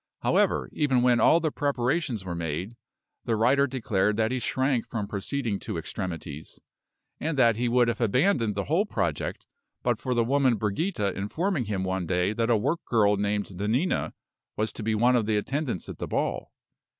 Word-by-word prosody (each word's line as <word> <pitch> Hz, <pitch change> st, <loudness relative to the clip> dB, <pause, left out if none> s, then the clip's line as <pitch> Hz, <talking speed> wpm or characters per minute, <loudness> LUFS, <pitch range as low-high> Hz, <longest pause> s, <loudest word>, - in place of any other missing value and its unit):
However, -, -, +2 dB
even 130 Hz, -5 st, +2 dB
when 125 Hz, -1 st, +4 dB
all 165 Hz, -, +5 dB
the 160 Hz, -2 st, -1 dB
preparations 130 Hz, -, -1 dB
were 90 Hz, -, -3 dB
made, 85 Hz, +6 st, -4 dB, 0.5 s
the 115 Hz, -, +1 dB
writer 135 Hz, +6 st, +3 dB
declared 105 Hz, -5 st, 0 dB
that 110 Hz, +1 st, +1 dB
he 130 Hz, -, -1 dB
shrank 130 Hz, 0 st, 0 dB
from 110 Hz, -3 st, -2 dB
proceeding 105 Hz, +1 st, -3 dB
to -, -, -5 dB
extremities; 80 Hz, -4 st, -6 dB, 0.6 s
and 155 Hz, -1 st, -2 dB
that 115 Hz, -4 st, +5 dB
he 120 Hz, +2 st, 0 dB
would 120 Hz, 0 st, +4 dB
have 120 Hz, 0 st, -1 dB
abandoned 120 Hz, -, +2 dB
the 100 Hz, -, -1 dB
whole 175 Hz, -, +1 dB
project -, -, -2 dB, 0.4 s
but -, -, 0 dB
for 125 Hz, -2 st, -1 dB
the 120 Hz, -, +3 dB
woman 130 Hz, 0 st, +3 dB
Brigida 105 Hz, -, -1 dB
informing 145 Hz, -, -1 dB
him 100 Hz, -3 st, -2 dB
one 95 Hz, -2 st, -2 dB
day 90 Hz, +3 st, +1 dB
that 115 Hz, +1 st, 0 dB
a 115 Hz, -, +4 dB
work 145 Hz, +10 st, -1 dB
girl 105 Hz, -3 st, +3 dB
named 100 Hz, 0 st, -1 dB
Nanina 110 Hz, -, 0 dB, 0.4 s
was 110 Hz, 0 st, -1 dB
to -, -, -7 dB
be 110 Hz, 0 st, 0 dB
one 120 Hz, +4 st, +4 dB
of 115 Hz, -3 st, +1 dB
the 110 Hz, -1 st, +2 dB
attendants 135 Hz, -, -2 dB
at -, -, -8 dB
the -, -, -3 dB
ball. -, -, -2 dB
115 Hz, 185 wpm, -27 LUFS, 100-130 Hz, 0.6 s, all